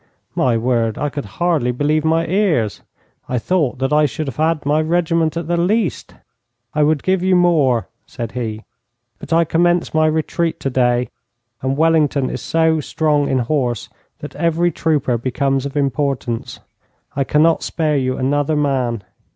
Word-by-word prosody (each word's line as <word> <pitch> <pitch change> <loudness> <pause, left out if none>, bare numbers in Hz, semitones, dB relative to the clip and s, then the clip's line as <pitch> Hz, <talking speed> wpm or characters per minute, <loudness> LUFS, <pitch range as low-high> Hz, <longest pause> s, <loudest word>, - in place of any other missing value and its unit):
My 120 -3 +1
word, 115 -2 0
I 150 - -1
could 145 -4 -5
hardly 165 -8 +1
believe 150 +4 0
my 165 +1 +2
ears! 170 - 0 0.5
I 125 - 0
thought 150 +1 0
that 135 +3 -1
I 150 0 +4
should 155 +4 -4
have 135 - -6
had 160 -1 0
my 150 +2 +2
regiment 165 0 0
at 170 - -3
the 175 0 0
least. 185 - -1 0.6
'I 150 - +1
would 150 -1 +2
give 185 -1 +1
you 185 0 +3
more,' 145 - +3 0.2
said 120 -6 -6
he, 110 -3 -4 0.6
'but - - -11
I 165 0 +4
commence 175 +2 +1
my 155 0 +3
retreat 160 +1 -1
today, 125 -2 +1 0.5
and 130 +1 -1
Wellington 155 -4 +2
is - - -5
so 160 -1 +2
strong 150 -1 0
in 135 - +1
horse 125 -5 -1 0.3
that - - -8
every 170 +1 +1
trooper 145 -7 0
becomes 135 +2 -1
of 140 - -6
importance. 135 -4 -2 0.5
I 140 - +1
cannot 155 +4 +3
spare 155 -3 0
you 130 -1 -1
another 145 +3 0
man. 130 -7 0
150 Hz, 160 wpm, -18 LUFS, 130-165 Hz, 0.6 s, I